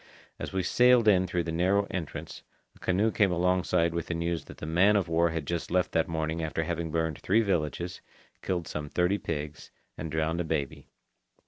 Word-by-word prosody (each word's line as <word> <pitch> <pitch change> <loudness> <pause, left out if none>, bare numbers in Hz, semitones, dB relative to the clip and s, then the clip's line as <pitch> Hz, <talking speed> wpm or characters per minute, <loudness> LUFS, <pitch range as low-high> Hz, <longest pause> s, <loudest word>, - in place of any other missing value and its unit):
As - - -5
we 95 -1 -1
sailed 125 0 +4
in 95 -3 +5
through 85 0 -1
the 85 - -4
narrow 95 +5 +2
entrance, 85 -5 -5 0.3
a - - -20
canoe 100 +5 +1
came 100 -4 +2
alongside 90 -1 +1
with 85 -1 -3
the 85 - -2
news 85 -1 -2
that - - -12
the - - -6
man 90 +6 +4
of 100 -4 +1
war 85 +1 +2
had 80 -2 -3
just 85 +2 -3
left 90 0 +1
that 80 - +1
morning 80 0 -2
after 80 0 -2
having 85 0 -3
burned 80 -1 -1
three 110 +5 +3
villages, 85 -2 -2 0.4
killed 90 -3 -2
some 75 -1 -5
thirty 90 +5 +1
pigs, 75 0 -5 0.3
and 80 - -4
drowned 80 +2 0
a - - -1
baby. 80 -4 -3
85 Hz, 200 wpm, -28 LUFS, 80-95 Hz, 0.4 s, in